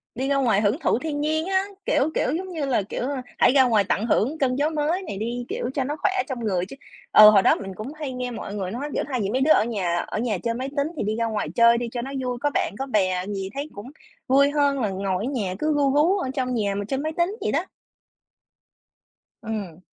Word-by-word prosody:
Đi 260 +3 -2
ra 280 - +2
ngoài 235 -7 +2
hưởng 215 +7 +1
thụ 240 - +1
thiên 290 0 -3
nhiên 315 +2 0
á, 380 0 +2 0.2
kiểu, 295 0 +2
kiểu, - - +1
giống 375 +1 -6
như 310 -4 -2
là, 255 -5 +1
kiểu, 205 - -5 0.3
hãy - - +5
ra 265 0 +6
ngoài 225 -5 +3
tận 200 +2 -1
hưởng 240 +6 +1
cơn 260 -4 +1
gió 290 +3 +1
mới 315 +4 0
này 205 - -6
đi, 240 +3 -3
kiểu, 245 - -3
cho 270 - 0
nó 290 +3 -3
khỏe 395 - +2 0.2
trong 260 -4 -4
người 185 -5 0
chứ 200 - -10 0.4
ừ, 215 0 +10
hồi 205 -2 +6
đó - - +4
mình 195 -1 -7
cũng 225 +9 -7
hay 305 -3 -5
nghe 250 0 -4
mọi 215 -3 -6
người 190 -3 -3
nói, 275 +6 -4
kiểu, - - 0
thay 260 -4 -2
vì 195 - -1
mấy 255 +5 0
đứa 300 +4 +4
ở - - +6
nhà 195 -7 -1
ở - - -3
nhà 225 -4 -1
chơi 230 +6 -2
máy 255 +3 -4
tính 280 +1 +2
thì - - -1
đi 215 +1 -1
ra 230 0 0
ngoài 220 -2 -2
chơi 235 0 +6
đi 240 0 -3
cho 240 - -3
nó 265 +3 -6
vui, 250 -1 -2
có 290 - +2
bạn, - - -1
có 270 - -1
bè 185 -7 0
gì 195 -2 -4
thấy 285 +2 -4
cũng 205 +5 -9 0.4
vui 280 +2 +5
hơn 285 -2 +2
là 220 -5 0
ngồi 195 +1 -2
ở - - -2
nhà, 205 -9 -2
cứ 310 0 +1
ru 280 -2 +2
rú 320 +7 +3
ở 315 -9 -2
trong 255 -2 -1
nhà 205 -4 0
mà 205 0 -3
chơi 270 +6 -2
máy 310 +2 -2
tính 350 +4 +1
vậy - - 0
đó. - - 0 1.8
Ừm. 205 -7 -5
250 Hz, 265 wpm, -24 LUFS, 210-285 Hz, 1.8 s, ừ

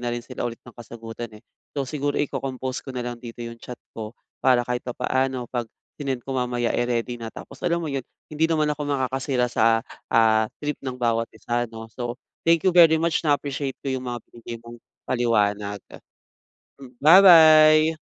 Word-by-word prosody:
na 120 - -3
rin 120 0 -6
sila 125 -1 -4
ulit 115 - -10
ng 125 - -13
kasagutan, 115 0 -8
eh. 105 - -18 0.3
So, 140 - 0
siguro 145 +1 -2
iko-compose 130 -2 -3
ko - - -15
na 125 -1 -3
lang 120 -1 -6
dito 120 0 -8
yung 115 0 -8
chat 125 - -8 0.2
ko 110 0 -7 0.3
para 125 -2 +4
kahit 125 0 -2
papaano 130 +1 -1
'pag 120 -2 -2 0.3
sinend 135 -4 -3
ko 135 - -8
mamaya, 125 -2 -1
eh, 120 - 0
ready 120 0 -2
na. 115 - -6
Tapos 135 +4 -11
alam 170 -1 0
mo 155 - -3
'yon, 135 -3 -4 0.2
hindi 155 +1 +1
naman 155 -2 +1
ako 150 0 -3
makakasira 130 -2 -1
sa, 115 0 +3 0.3
ah, 110 -1 +4 0.2
trip 150 -1 -2
ng 130 -2 -5
bawat 115 -2 0
isa 120 +2 -2
'no. 115 0 -10
So, 120 +1 -5 0.3
thank 165 -1 +4
you 190 - +4
very 170 -2 +7
much 165 0 +1
na-appreciate 140 -2 -1
ko 135 - -3
yung 130 -1 -3
mga 120 -2 -4
binigay 115 0 -8
mong 120 0 -11 0.3
paliwanag. 105 -4 0 1.0
Hmm, 130 -2 -13
ba-bye. 155 -2 +8
125 Hz, 185 wpm, -24 LUFS, 120-145 Hz, 1.0 s, ba-bye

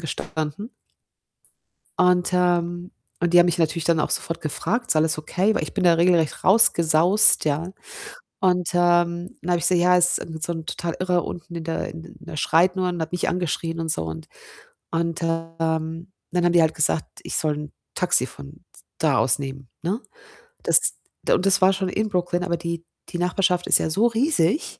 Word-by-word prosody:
gestanden. 160 - -5 1.3
Und, 180 0 +3
ähm 175 0 0 0.3
und 175 0 0
die 175 - +7
haben 175 - +5
mich 175 - 0
natürlich 165 0 -1
dann 165 -1 +1
auch - - -1
sofort 165 - +2
gefragt: 190 - -3
„Ist - - +2
alles 155 0 +2
okay?“ 185 +7 0
Weil - - -2
ich 155 - -7
bin 195 - -2
ja 175 -2 +5
regelrecht 170 -2 +1
rausgesaust, 180 -2 +6
ja, 155 +5 -2 0.7
und, 180 -3 +1
ähm, 175 0 +1
dann 180 - -3
habe 175 - +2
ich - - -5
gesagt: 180 -1 +3
„Ja, 180 +1 +4
es 175 0 +3
ist - - -7
'n 160 -1 -9
so 165 - -1
'n 160 -1 -7
total 170 0 -4
Irrer 180 -1 0
unten 170 0 -8
in 165 - -5
der 165 0 -4
und 165 +1 -12
der - - -10
schreit 175 +5 +2
nur 185 -1 -1
und 175 -1 -4
hat 160 - -4
mich 180 -2 -1
angeschrien“ 165 -1 -3
und 165 0 -3
so. 80 - -1
Und 80 0 -8 0.6
und, 165 0 -2
ähm, 165 +1 -3 0.2
dann 175 0 0
haben 175 - +2
die 170 - +5
halt 160 -1 +2
gesagt, 155 0 0 0.2
ich - - -4
soll 155 -2 0
'n 150 -1 -8 0.2
Taxi - - +2
von 70 -1 -13 0.4
da - - +2
aus 130 - +3
nehmen, 135 -1 -7
ne? 195 +9 -3 0.6
Das - - +3 0.3
de - - +2
und 185 - -2
das 195 0 +4
war 190 +1 +5
schon 190 -1 -2
in 215 +4 -1
Brooklyn, 180 -1 -1
aber 170 -1 -1
die 170 0 -5 0.2
die - - -5
Nachbarschaft 180 0 0
ist - - +6
ja - - -2
so 205 +9 +2
riesig. 235 - 0
170 Hz, 200 wpm, -22 LUFS, 160-180 Hz, 1.3 s, die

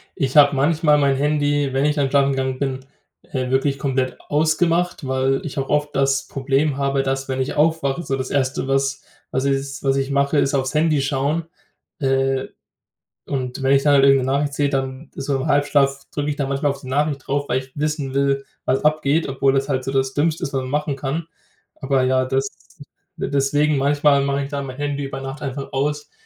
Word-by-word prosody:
ich 135 +2 -1
habe 145 -1 +7
manchmal 150 +2 +3
mein 140 -2 +2
Handy, 145 -1 +1
wenn 135 +2 +1
ich 150 - +2
dann 140 -3 +1
schlafen 140 0 +3
gegangen 130 -1 -1
bin, 135 -1 -3 0.4
äh, 130 -2 -3
wirklich 135 +1 +1
komplett 130 -2 -1
ausgemacht, 165 +2 +1
weil 130 +1 0
ich 150 - -7
auch 135 -1 -1
oft 150 0 0
das 135 0 +1
Problem 140 +1 0
habe, 140 -1 0
dass, 135 0 -2
wenn 130 -1 -2
ich 130 - -2
aufwache, 155 -1 +1
so 135 -3 -1
das 130 -1 -4
Erste, 135 -1 -1
was 135 0 0 0.3
was 130 - 0
s 135 -1 -2
was 135 0 +2
ich 135 0 -1
mache, 140 +1 +1
ist 140 - +2
aufs 135 0 0
Handy 155 -2 +2
schauen. 140 +4 -1 0.5
Äh, 135 -1 +1 0.8
und 130 -1 -3
wenn 135 +1 +4
ich 135 - +3
dann 145 - +4
halt 135 - +5
irgend 135 -2 +4
'ne 130 - 0
Nachricht 145 +1 0
sehe, 145 0 +1
dann 135 +1 -3
so 140 0 -2
im 130 - -3
Halbschlaf 140 -1 +2
drücke 145 0 -2
ich 145 - -1
da 140 - -1
manchmal 140 +2 0
auf 140 0 -4
die 130 - -10
Nachricht 145 0 -1
drauf, 145 +1 -1
weil 125 - +2
ich 130 0 -12
wissen 150 -2 -2
will, 140 0 +1 0.2
was 135 +3 0
abgeht, 155 +1 +2
obwohl 135 0 +1
das 135 0 0
halt 130 -2 0
so 135 - -3
das 135 0 0
Dümmste 155 +2 0
ist, 140 - -4
was 135 - 0
man 130 - -6
machen 150 0 -1
kann. 140 +4 -3 0.6
Aber 135 -1 +1
ja, 130 0 +2
das 135 +1 0 0.7
d - - -3
deswegen 145 +2 +2
manchmal 145 +1 +3
mache 140 0 0
ich 140 - -6
da 140 -2 -3
mein 130 -2 -7
Handy 145 -1 -2
über 135 0 -6
Nacht 135 +2 -7
einfach 135 0 -5
aus, 150 +2 -2
140 Hz, 215 wpm, -21 LUFS, 135-145 Hz, 0.8 s, habe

